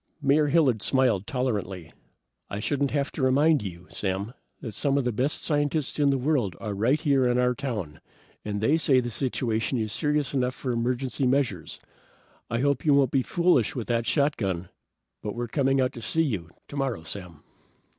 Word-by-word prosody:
Mayor 145 +1 +3
Hilliard 140 -8 +3
smiled 120 -7 +1
tolerantly. 100 - -3 0.6
"I 100 - -4
shouldn't 140 +5 0
have 140 0 -1
to - - -5
remind 145 +4 +4
you, 90 -3 -7
Sam, 100 +3 -3 0.3
that 115 - -6
some 135 +7 0
of 140 - +1
the 125 - 0
best 130 +7 -1
scientists 145 -1 0
in 145 -1 +4
the 135 - +2
world 125 - 0
are 105 -2 -4
right 120 +9 +2
here 140 -5 +2
in 125 0 +2
our 125 0 +3
own 125 - -1
town, 110 - -5 0.4
and 105 -1 -3
they 140 +9 +3
say 135 -5 +4
the 120 -1 -3
situation 120 -1 -1
is 110 -2 -2
serious 150 -2 0
enough 130 -1 0
for 130 -2 -3
emergency 125 +3 0
measures. 125 - -1 0.7
I 115 +1 -1
hope 140 -1 +1
you 145 -3 +4
won't 135 -3 +3
be 135 - +3
foolish 170 - +2
with 120 -4 -4
that 115 -1 0
shotgun, 100 - 0 0.5
but 105 0 -4
we're 120 0 -3
coming 135 +2 +1
out 130 -1 +1
to 120 - -8
see 165 +5 +1
you, 100 - -2 0.2
tomorrow, 135 - -3
Sam." 90 -3 -9
125 Hz, 185 wpm, -26 LUFS, 110-140 Hz, 0.7 s, remind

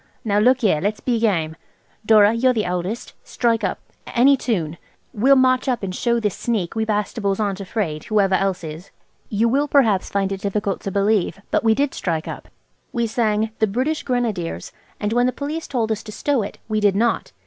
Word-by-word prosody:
Now 205 -1 +2
look 250 +4 +4
here, 185 -9 +2
let's 205 +2 -1
be 240 -3 0
game. 165 -8 0 0.5
Dora, 215 -1 +5
you're 255 +2 +3
the 215 - 0
eldest. 180 +5 -3
Strike 230 -2 0
up–any 245 +7 +1
tune. 175 - -2 0.4
We'll 260 +6 +4
march 255 -1 +3
up, 245 -4 -1
and 185 -1 -3
show 235 +4 +1
this 210 -4 -1
sneak 215 -7 -2
we 220 0 -1
Bastables 210 -1 -1
aren't 200 -2 -1
afraid, 185 -6 -3
whoever 200 -3 +2
else 190 -2 0
is." 160 +3 -8 0.4
You 220 +2 +1
will 280 +5 +1
perhaps 225 -10 +3
find 195 -1 -1
it 195 -1 -4
difficult 200 -1 -2
to 195 - -4
believe, 200 -1 +1
but - - +1
we 225 -1 +4
did 280 +2 0
strike 165 -3 -2
up. - - -7 0.4
We 235 -1 0
sang 220 -1 0
"The 220 - +3
British 260 +10 -1
Grenadiers," 230 -9 -2 0.3
and 210 +1 -1
when 245 +1 +3
the - - +1
Police 300 +5 -5
told 230 -4 -1
us 220 0 -1
to 215 - -10
stow 275 +3 0
it 200 - -6
we 215 -1 0
did 205 -2 +3
not. 230 +3 0
215 Hz, 195 wpm, -21 LUFS, 195-240 Hz, 0.5 s, Dora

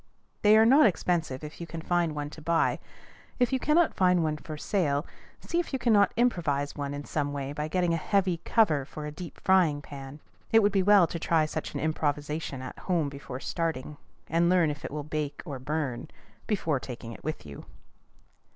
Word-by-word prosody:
They 210 +1 +6
are 220 - +6
not 270 +3 +7
expensive 165 -7 -1
if 150 +2 -8
you 170 - -5
can 165 - -6
find 170 -1 0
one 145 0 -4
to 155 - -11
buy. 165 +1 +1 0.6
If 245 +1 +1
you 260 - +2
cannot 310 +5 +3
find 180 -2 +3
one 155 -1 -1
for 155 0 -8
sale, 150 -5 0 0.4
see 340 - -1
if 345 - -3
you - - +2
cannot 220 -5 +4
improvise 155 - +1
one 145 -1 -4
in 145 0 -6
some 145 -2 -2
way 140 0 -4
by 150 +1 -3
getting 175 +1 +1
a - - +1
heavy 190 +1 +1
cover 165 - +2
for 150 +3 -8
a 150 - -4
deep 170 +2 -9
frying 180 -6 +3
pan. 140 0 -9 0.3
It 225 -1 +6
would 205 - +4
be 195 -1 +2
well 200 -1 +6
to 170 0 -5
try 160 -1 +2
such 155 - -5
an - - -1
improvisation 150 -2 -2
at 130 - -8
home 170 -6 0
before 140 -2 -8
starting, 155 -4 -3 0.3
and 170 +2 +2
learn 175 -4 +4
if 145 0 -8
it - - -4
will 150 +1 -4
bake 150 -1 -4
or 135 -3 -6
burn, 140 -2 -3 0.4
before 165 - 0
taking 120 -2 -8
it - - -11
with 155 - -4
you. 70 -2 -10
155 Hz, 205 wpm, -28 LUFS, 145-185 Hz, 0.6 s, not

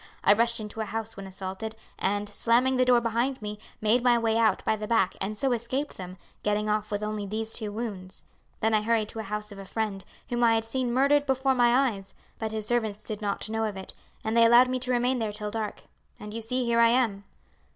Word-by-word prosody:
I 200 - +7
rushed 235 +2 +2
into 215 +1 -5
a - - -1
house 225 +1 -4
when 195 0 -8
assaulted, 190 +3 -6 0.2
and, 205 +1 0
slamming 240 +5 +2
the 255 - +4
door 250 -1 +5
behind 235 +3 -1
me, 210 0 -6 0.2
made 220 +3 +3
my 245 -1 +5
way 225 -1 +1
out 225 -3 +2
by 220 - +2
the 210 0 -5
back 225 -5 +2
and 210 +2 -3
so 270 +2 +1
escaped 245 +5 -2
them, 185 0 -8 0.2
getting 210 0 0
off 210 0 0
with 205 -1 -2
only 210 -1 -3
these 220 +2 -3
two 215 -3 -3
wounds; 205 -4 -6 0.4
then 220 +1 +2
I 215 - +4
hurried 220 -1 +1
to 225 - -7
a - - -1
house 210 0 -5
of 200 - -9
a 195 - -8
friend, 205 -2 -3 0.3
whom 240 0 0
I 230 -1 +5
had 225 0 0
seen 245 +1 -1
murdered 280 +3 +3
before 265 0 +2
my 250 +1 +4
eyes, 195 -2 -11 0.2
but 220 -1 -2
his 215 -1 -3
servants 220 -3 -1
did 215 -1 -5
not 200 0 -2
know 225 +1 -1
of 210 -3 -2
it, 190 - -6 0.3
and 220 +1 -1
they 230 0 +7
allowed 240 +2 +7
me 255 0 -1
to 255 0 -2
remain 250 +1 +2
there 220 -2 -1
till 210 0 -5
dark, 215 -1 -4 0.4
and 210 0 -8
you 230 - -4
see 250 +3 -1
here 235 0 +2
I 230 - +7
am." 230 -5 +1
220 Hz, 240 wpm, -27 LUFS, 210-240 Hz, 0.4 s, I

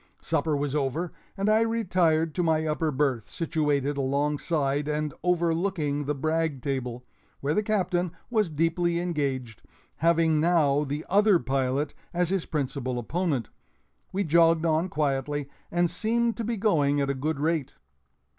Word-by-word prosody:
Supper 155 -3 0
was 140 -1 -2
over, 150 +4 -1 0.3
and 195 +1 0
I 215 +1 +4
retired 180 -8 +1
to 180 - 0
my 160 -2 +2
upper 155 +1 0
berth, 130 -5 0
situated 145 -3 0
alongside 145 +1 0
and 150 -1 -1
overlooking 170 -4 0
the 150 +1 -1
brag 155 -2 -1
table, 125 -3 -3 0.3
where 145 +2 0
the 210 - +2
Captain 185 -4 0 0.2
was 215 -6 +2
deeply 165 +2 +1
engaged, 140 -9 -2 0.4
having 165 -1 +3
now 150 -3 +3
the 145 +2 -4
other 205 0 +5
pilot 135 0 -1 0.2
as 175 -1 +1
his 190 -2 -1
principal 135 -4 -2
opponent. 140 - -1 0.6
We 200 +2 0
jogged 165 0 +4
on 165 +3 +1
quietly 145 -1 -1 0.2
and 175 0 +2
seemed 230 +6 0
to 230 - -2
be 230 +1 -2
going 145 -9 +2
at 140 -1 +1
a - - -1
good 140 +2 -2
rate. 155 -2 -1
155 Hz, 145 wpm, -27 LUFS, 140-175 Hz, 0.6 s, other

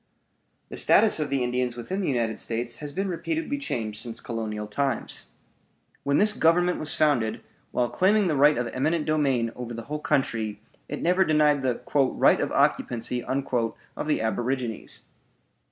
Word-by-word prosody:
The - - -7
status 220 -7 +5
of 150 -2 -1
the 135 -2 0
Indians 125 0 -1
within 185 +12 -4
the 185 - -1
United 115 -4 -1
States 120 +1 -2
has 150 -1 -6
been 195 +7 -2
repeatedly 285 - -2
changed 110 - -2
since 115 0 -6
colonial 110 -2 -4
times. 130 +4 -2 0.7
When 140 +1 +1
this 210 +1 +5
Government 175 +1 +3
was 155 - -4
founded, 125 -8 +2 0.3
while 125 - 0
claiming 200 - +3
the 160 -4 +1
right 145 +2 +5
of 120 - 0
eminent 155 +4 0
domain 135 -7 +1
over 120 -1 -6
the 115 - -6
whole 150 - -1
country, 110 -7 -1 0.3
it - - -4
never 180 +2 +4
denied 150 -3 +3
the 130 -2 -1 0.3
"right - - +4
of - - -1
occupancy" 120 +1 0
of 130 0 -3
the 155 - +1
aborigines. 120 +1 -3
135 Hz, 160 wpm, -26 LUFS, 115-155 Hz, 0.7 s, status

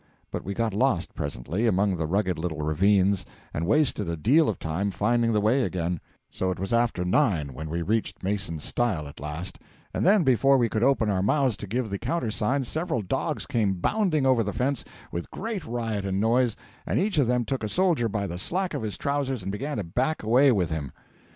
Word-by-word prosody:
But - - -4
we 100 +1 -4
got 115 -3 0
lost 105 -5 +1
presently 75 - -2
among 100 -1 +2
the 80 -2 -2
rugged 95 0 0
little 80 -3 -3
ravines, 95 +4 +3 0.3
and 80 +2 -2
wasted 130 - +2
a 85 - -2
deal 140 - +4
of 100 - -2
time 85 +6 -2
finding 115 +4 +1
the 105 - +2
way 110 +6 +3
again, 90 -6 -1 0.3
so 95 - -1
it 95 - -2
was 95 +4 -2
after 115 -6 +1
nine 90 - +1
when 80 +5 -6
we 85 +2 -2
reached 110 +3 -1
Mason's 95 -6 -2
stile 95 -12 -1
at 70 - -11
last; 75 +6 -6 0.3
and - - -1
then 195 +1 +5
before 135 +1 +4
we 120 -2 +2
could 110 - -1
open 120 -4 +3
our 95 -2 +1
mouths 130 +3 +2
to 105 - -7
give 115 +1 -2
the 100 - -2
countersign, 125 -1 -1
several 155 -2 -2
dogs 90 - -2
came 105 -5 +1
bounding 155 - +1
over 130 -3 +4
the 100 -2 -2
fence, 135 +2 -1 0.3
with 85 0 -4
great 220 -2 -4
riot 115 -3 -2
and 95 0 -1
noise, 115 +2 +2 0.3
and - - 0
each 195 -3 +1
of 135 - +3
them 125 -1 +1
took 135 -2 -3
a 110 - -2
soldier 170 - +2
by 100 -1 -2
the 90 -2 -5
slack 185 - -1
of - - -2
his 110 -2 -4
trousers 140 -5 -1
and 95 - -3
began 135 +7 -3
to 105 - -1
back 125 - -1
away 130 +6 +5
with 90 -8 +1
him. 75 -4 -3
110 Hz, 215 wpm, -26 LUFS, 90-130 Hz, 0.3 s, then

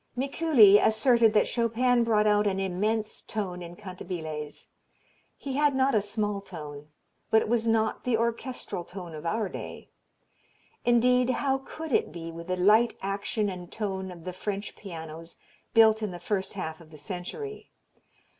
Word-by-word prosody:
Mikuli 265 -7 +6
asserted 225 0 +4
that 210 - +4
Chopin 240 +1 +2
brought 215 -2 +2
out 210 0 +3
an 195 -1 0
"immense" 210 +4 -1
tone 185 -4 -4
in 175 0 -8
cantabiles. 170 -6 -6 0.7
He 275 - -5
had 295 -2 +3
not 265 +1 +3
a 215 - +4
small 205 -1 -2
tone, 150 -6 -9 0.4
but 220 - +4
it - - -5
was 230 0 +1
not 220 -1 +1
the 245 -3 +1
orchestral 235 -4 -3
tone 175 -1 -9
of 155 +2 -6
our 215 +3 0
day. - - -8 1.0
Indeed 250 +1 +4
how 270 +1 +1
could 315 +3 -8
it - - +2
be, 165 0 -7
with 170 +1 -9
the 185 0 -1
light 215 +6 +4
action 200 +2 -1
and 180 -2 -6
tone 190 -3 -3
of 175 -2 -10
the 185 - -5
French 200 +2 -4
pianos 165 -3 -9 0.4
built 220 -1 +6
in 215 - -1
the 175 -1 -7
first 190 +2 -2
half 160 -4 -5
of 160 - -16
the 155 - -13
century? 190 - -6
210 Hz, 165 wpm, -28 LUFS, 180-230 Hz, 1.0 s, Mikuli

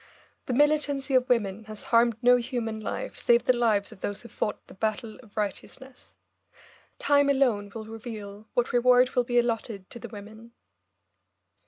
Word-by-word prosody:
The 255 - -1
militancy 290 0 +2
of 255 -1 +3
women 220 -3 0
has 215 -1 -7
harmed 230 -1 +4
no 245 0 +6
human 235 -2 -3
life 215 - -5
save 235 0 +4
the 255 - +3
lives 220 -4 +1
of 215 - -14
those 205 +2 -4
who 235 - -11
fought 210 - -3
the - - -14
battle 220 +3 -3
of 225 -3 -21
righteousness. 250 +5 -6 0.8
Time 285 -1 +3
alone 240 -8 +1
will 220 -1 -6
reveal 220 -2 -8
what 245 0 0
reward 250 +1 +5
will 250 -1 +1
be 245 0 0
allotted 225 -4 -1
to 235 - -8
the - - -8
women. 220 +2 -11
235 Hz, 165 wpm, -27 LUFS, 215-250 Hz, 0.8 s, no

